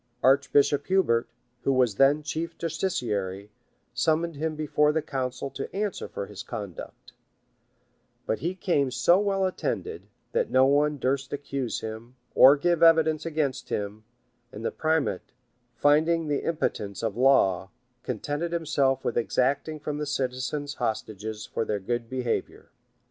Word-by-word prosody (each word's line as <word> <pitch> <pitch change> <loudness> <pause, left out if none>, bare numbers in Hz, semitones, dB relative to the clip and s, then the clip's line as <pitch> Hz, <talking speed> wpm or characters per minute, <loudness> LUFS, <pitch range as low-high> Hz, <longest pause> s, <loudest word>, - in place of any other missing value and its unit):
Archbishop 140 +2 +3
Hubert, 185 -12 +2 0.4
who 135 - +2
was 125 -4 +3
then 145 +3 +4
chief 165 +2 -4
justiciary, 105 - -2 0.4
summoned 160 +6 +1
him 155 +2 -2
before 150 0 +2
the 160 0 -1
council 135 0 -3
to - - -6
answer 205 -1 -2
for 100 - -5
his 105 0 -9
conduct; 105 -6 -8 1.1
but 110 - -1
he 175 +3 -2
came 150 -8 +1
so 130 +9 +4
well 195 -2 +1
attended, 425 - -3 0.2
that 480 -1 0
no 130 - +5
one 145 +2 +2
durst 135 0 -1
accuse 140 -3 -3
him, 110 +3 -7 0.2
or 140 +3 +8
give 170 +2 +1
evidence 160 -1 +4
against 150 -4 -2
him; 105 +1 -3 0.5
and 110 +2 -8
the - - 0
primate, 155 - -1 0.4
finding 160 +3 +3
the 145 -1 -1
impotence 105 - -2
of 110 -3 -1
law, 100 -8 +3 0.3
contented 145 +8 -3
himself 145 -6 0
with - - -1
exacting 140 +6 0
from 150 0 -4
the 150 - -3
citizens 135 +1 -2
hostages 110 -1 -3
for - - -2
their 105 -2 -2
good 120 +4 -3
behavior. 125 -2 -3
140 Hz, 140 wpm, -27 LUFS, 120-160 Hz, 1.1 s, or